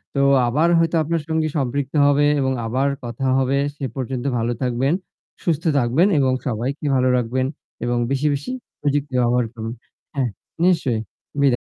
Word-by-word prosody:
তো - - +1 0.3
আবার 150 +8 +2
হয়তো 165 0 +2
আপনার 165 +1 -1
সঙ্গে 160 -1 +1
সম্পৃক্ত 135 +1 -1
হবে 145 +1 +4
এবং 130 -1 +1
আবার 130 +5 +1 0.2
কথা 120 +3 -4
হবে। 135 +1 +2 0.2
সে 140 - -4
পর্যন্ত 130 -1 -3
ভালো 115 +1 0
থাকবেন, 130 +4 +1 0.5
সুস্থ 165 -3 0
থাকবেন 140 +9 +3
এবং 130 -2 +3 0.2
সবাইকে 125 +6 -2
ভালো 130 0 +3
রাখবেন 125 +2 0 0.4
এবং 120 0 0
বেশি, 140 +2 +1
বেশি 140 - -4 0.3
প্রযুক্তি 145 -1 0
ব্যবহার 120 0 +2
করবেন। 115 0 -5 0.4
হ্যাঁ, 130 -3 +1 0.3
নিশ্চয়ই 135 -11 +2 0.4
বিদায়। 140 -2 +5
135 Hz, 155 wpm, -21 LUFS, 120-145 Hz, 0.5 s, বিদায়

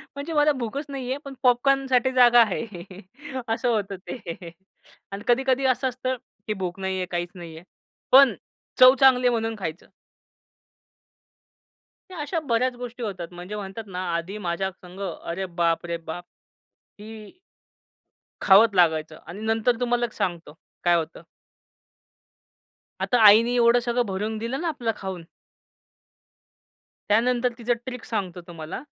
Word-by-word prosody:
म्हणजे 290 +4 -5
मला 300 0 +4
भूकच 270 +2 -4
नाहीये. 265 -1 -4
पण 275 - -7
पॉपकॉर्न 270 +2 +3
साठी 260 0 +2
जागा 245 -2 +6
आहे 210 -4 -5 0.6
असं 225 +3 -1
होतं 200 -4 -1
ते 170 -6 -7 0.6
आणि 200 +1 -6
कधी-कधी 265 +2 +2
असं 260 0 +2
असतं, 255 +1 -3 0.3
की 215 - 0
भूक 185 -1 -5
नाहीये 190 -1 -2
काहीच 175 0 -2
नाहीये. 165 -2 -10 0.5
पण 270 0 +8 0.5
चव 255 +1 +9
चांगली 255 -2 +5
आहे - - +4
म्हणून 225 -1 -1
खायचं. 165 -2 -6 2.2
अशा 330 0 -3
बऱ्याच 255 -3 0
गोष्टी 245 0 -7
होतात. 185 -6 -5
म्हणजे 180 +4 -7
म्हणतात 205 +2 -6
ना 185 -1 -5
आधी 175 +5 -4
माझ्या 190 0 -2
संग 180 0 -15 0.2
अरे 175 +3 -4
बाप 170 -2 0
रे 170 0 -3
बाप! 165 +1 -7 0.8
ती 215 - -11 1.0
खावचं 205 +2 +6
लागायचं. 160 -3 +2
आणि 180 +5 -8
नंतर 225 +1 +1
तुम्हाला 240 -1 +1
एक 230 - -9
सांगतो 175 -4 -3 0.3
काय 175 0 +4
होतं? 165 -2 -3 1.8
आता 245 - +2
आईनी 230 +4 +7
एवढं 235 0 +5
सगळं 240 0 0
भरून 210 +2 -3
दिलं 235 +6 -4
ना 345 - -2
आपलं 245 -8 -1
खाऊन 190 -3 -6 1.9
त्यानंतर 245 +3 +2
तिचं 240 0 0
ट्रिक 250 -2 -7
सांगतो 185 -5 -4
तुम्हाला. 165 +3 -7
225 Hz, 135 wpm, -24 LUFS, 180-250 Hz, 2.2 s, चव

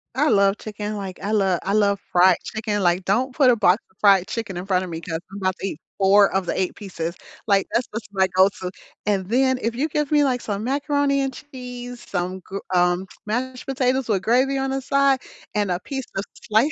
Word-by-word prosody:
I 295 +3 +3
love 200 0 +4
chicken, 210 0 -5
like, 190 -3 -6
I 205 - -2
lo 195 -4 +2
I 195 - -1
love 200 -2 +3
fried 180 0 +5
chicken, 215 -2 -2
like, 175 +1 +2
don't 250 +8 +1
put 275 -4 +5
a 245 - +5
box 200 -2 +3
of 190 - -33
fried 195 -3 +5
chicken 205 -6 -4
in 180 - -5
front 185 -1 +2
of 185 - -6
me 165 0 -5
'cause 160 -2 -4
I'm 200 - -7
about 185 -1 0
to 195 - -2
eat 160 - -6 0.2
4 200 +1 +5
of 190 -1 0
the - - -2
8 185 - -1
pieces, 170 -4 -5 0.3
like, 200 -2 +3
that's 235 +1 +1
what's 220 +1 -6
my 190 -1 +2
go-to, 190 -1 +3 0.4
and 195 -3 +1
then 260 +3 +2
if 230 -1 -1
you 290 +6 0
give 300 -1 -1
me, 295 -1 +5
like, 255 -3 +1
some 205 0 -3
macaroni 280 +1 +1
and 270 -1 -2
cheese, 245 -3 -9
some 185 0 -2
gr 195 +2 -7 0.2
um, 180 +1 +2 0.2
mashed 250 +4 -3
potatoes 260 -1 0
with 200 -4 +1
gravy 260 +5 +2
on 270 0 -1
the 270 0 -2
side 275 0 +3 0.4
and 205 -3 +1
a 175 - 0
piece 265 +6 -5
of 195 - -1 0.2
slice 225 +8 +3
210 Hz, 225 wpm, -23 LUFS, 190-260 Hz, 0.4 s, fried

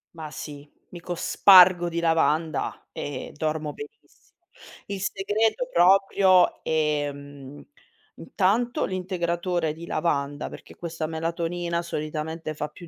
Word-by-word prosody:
Ma 155 -2 -8
sì, 145 +1 -9 0.2
mi 175 - -10
cospargo 180 0 +5
di 170 0 -3
lavanda 160 -1 0
e 140 -3 -6
dormo 155 0 -2
benissimo. 435 +1 -14 0.5
Il 200 -2 -5
segreto 215 - 0
proprio, 190 - +4
ehm, 145 -2 -3 0.5
intanto 225 +6 0
l'integratore 175 -3 -2
di 165 +2 -10
lavanda 145 -4 -2
perché - - -12
questa 165 -2 -5
melatonina 170 +2 -3
solitamente 155 0 -5
fa 150 - -3
più 170 +3 -13
170 Hz, 105 wpm, -25 LUFS, 155-185 Hz, 0.5 s, cospargo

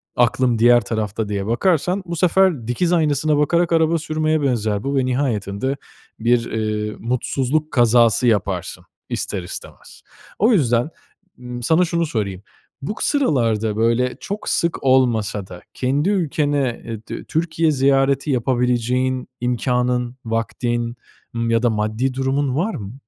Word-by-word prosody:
aklım 120 -1 +2
diğer 120 +1 +6
tarafta 110 -1 -3
diye 100 -1 -2
bakarsan 180 - +1
bu 170 -1 -4
sefer 175 -7 +2
dikiz 170 +9 0
aynasına 150 -2 +2
bakarak 170 +4 +2
araba 165 0 +3
sürmeye 155 0 0
benzer 110 -7 0
bu 140 +1 -2
ve 130 - +2
nihayetinde 125 -1 -1 0.4
bir, 115 +1 +1
eee, 105 -1 -2
mutsuzluk 135 +5 -1
kazası 120 -1 +4
yaparsın 105 -5 -1 0.3
ister 95 -3 -3
istemez. 90 - -10 0.4
O 220 +5 +4
yüzden, 125 - +2 0.5
ımm, 125 -1 -7
sana 160 +8 +3
şunu 170 0 0
sorayım. 100 - -3 0.4
Bu 145 +10 -4
k - - -4
sıralarda 115 - +1
böyle 115 +3 +1
çok 205 +2 -5
sık 170 0 0
olmasa 115 -7 +2
da 90 -1 -10
kendi 140 +7 0
ülkene, 145 - 0
eee, 115 -2 -5
dü - - -6
Türkiye 160 0 0
ziyareti 135 +1 +2
yapabileceğin 125 +1 0
imkânın, 125 0 0
vaktin, 120 +1 -2 0.4
ımm, 115 0 -1
ya 115 +1 +2
da 120 - +4
maddi 110 +4 -1
durumun 135 0 0
var 190 +9 -1
mı? 100 0 -7
125 Hz, 140 wpm, -20 LUFS, 115-150 Hz, 0.5 s, diğer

